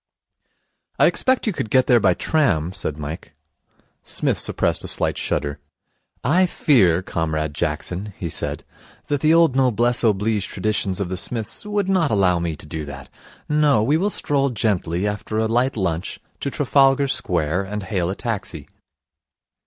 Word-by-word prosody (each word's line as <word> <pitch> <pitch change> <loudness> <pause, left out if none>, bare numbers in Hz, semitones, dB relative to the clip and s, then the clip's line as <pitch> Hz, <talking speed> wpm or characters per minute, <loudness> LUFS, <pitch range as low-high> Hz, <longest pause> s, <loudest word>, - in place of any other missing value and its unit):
'I - - +5
expect 260 0 +2
you 215 - 0
could 110 - -4
get 130 +3 +4
there 120 -2 +5
by 95 -4 +3
tram,' 95 - +1
said 75 -5 -4
Mike. 75 +2 -7 0.7
Psmith - - 0
suppressed - - 0
a - - -6
slight - - 0
shudder. 70 0 -2 0.6
'I 180 +8 +3
fear, 95 - +3
Comrade 80 -3 -2
Jackson,' 85 +6 -3
he 85 - -4
said, 80 - -2 0.4
'that 145 -2 -1
the 155 - +4
old 165 -5 +4
noblesse 120 -2 +2
oblige 105 -1 +1
traditions 100 -1 -1
of 100 -3 -2
the 95 - -3
Psmiths 115 - -3
would 205 -2 -1
not 185 -5 +2
allow 95 -5 +2
me 85 -2 -2
to - - -5
do 75 +1 -5
that. 70 -2 -9 0.4
No. 150 -7 +3
We 140 +7 +2
will 190 +6 +1
stroll 140 -7 +1
gently, 100 -5 -1
after 105 +1 -4
a 110 - +2
light 120 +3 +1
lunch, 90 -2 -2 0.2
to 140 - -2
Trafalgar 140 0 +3
Square, 90 - -1
and 105 +1 -5
hail 95 -3 -1
a 95 - -2
taxi.' 100 - -4
105 Hz, 160 wpm, -21 LUFS, 85-135 Hz, 0.7 s, I